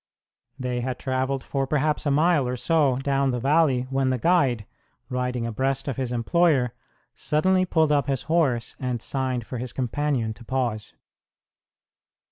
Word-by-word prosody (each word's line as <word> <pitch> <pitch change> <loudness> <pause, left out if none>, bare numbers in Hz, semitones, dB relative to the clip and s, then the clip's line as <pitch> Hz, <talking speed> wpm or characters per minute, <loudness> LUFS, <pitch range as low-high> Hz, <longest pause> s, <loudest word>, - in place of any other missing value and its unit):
They 125 -1 -2
had 125 0 -3
travelled 130 0 -2
for 135 -1 -2
perhaps 150 +1 0
a - - +3
mile 150 -1 +3
or 125 - -2
so 145 0 +2
down 140 0 +1
the 125 -1 -1
valley 135 -1 +3
when 135 -1 +1
the 130 - +1
guide, 130 - +2 0.4
riding 125 -1 -2
abreast 135 +4 -1
of 135 - -3
his 130 -2 -2
employer, 125 0 +2 0.4
suddenly 185 +5 +1
pulled 160 -4 +2
up 145 -1 +2
his 135 -3 -1
horse 145 -7 0
and 125 -2 -2
signed 130 -1 -2
for 125 - -6
his 125 0 -5
companion 130 -2 -1
to 120 - -15
pause. 115 -3 -2
130 Hz, 155 wpm, -25 LUFS, 125-145 Hz, 0.4 s, a